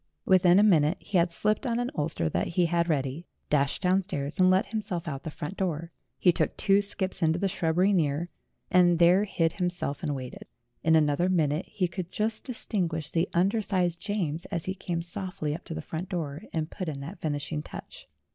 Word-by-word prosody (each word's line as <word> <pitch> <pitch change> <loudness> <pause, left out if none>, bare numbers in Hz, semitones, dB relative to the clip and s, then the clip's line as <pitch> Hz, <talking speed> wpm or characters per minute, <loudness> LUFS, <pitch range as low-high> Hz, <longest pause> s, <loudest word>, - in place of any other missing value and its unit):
Within 185 -1 +5
a 205 - +6
minute 165 -4 +4
he 190 - 0
had 170 +1 +3
slipped 215 +8 0
on 235 -1 0
an 245 +1 -1
ulster 150 - -1
that 85 +3 -1
he 175 +1 +2
had 170 0 +1
ready, 145 +2 -1 0.2
dashed 140 +3 +1
down 185 +1 +3
stairs, 145 -4 -4
and 185 0 +6
let 190 +4 +4
himself 200 -6 -4
out 140 -3 -2
of - - -14
the 160 - -5
front 150 +5 -6
door. 170 -3 -2 0.3
He 180 - +5
took 165 - -1
two 195 +1 +4
skips 190 -2 -3
into 160 0 +3
the 195 - +1
shrubbery 180 +1 +2
near, 160 -2 +1 0.4
and 175 -1 +5
there 175 +4 +5
hid 165 -5 0
him 180 -2 0
self 150 -5 -4
and 150 -4 -1
waited. 130 -2 -8 0.4
In 160 0 +4
another 155 +3 +3
minute 160 -2 +1
he 185 -3 -1
could 175 0 -6
just 220 +1 -1
dis 250 -4 -4
tinguish 165 -6 -1
the 170 +2 +1
under 195 +6 +3
sized 180 -4 0
James 175 -6 -2
as 170 -5 -4
he 185 - -1
came 175 -3 -3
softly 175 -4 -4
up 165 - -7
to 160 - -5
the 160 - -5
front 165 +4 -5
door, 155 -5 -4
and 155 -1 -2
put 185 -5 -4
in 140 -3 -5
that 170 +7 -8
finishing 150 0 -2
touch. - - -10
175 Hz, 215 wpm, -28 LUFS, 155-190 Hz, 0.4 s, a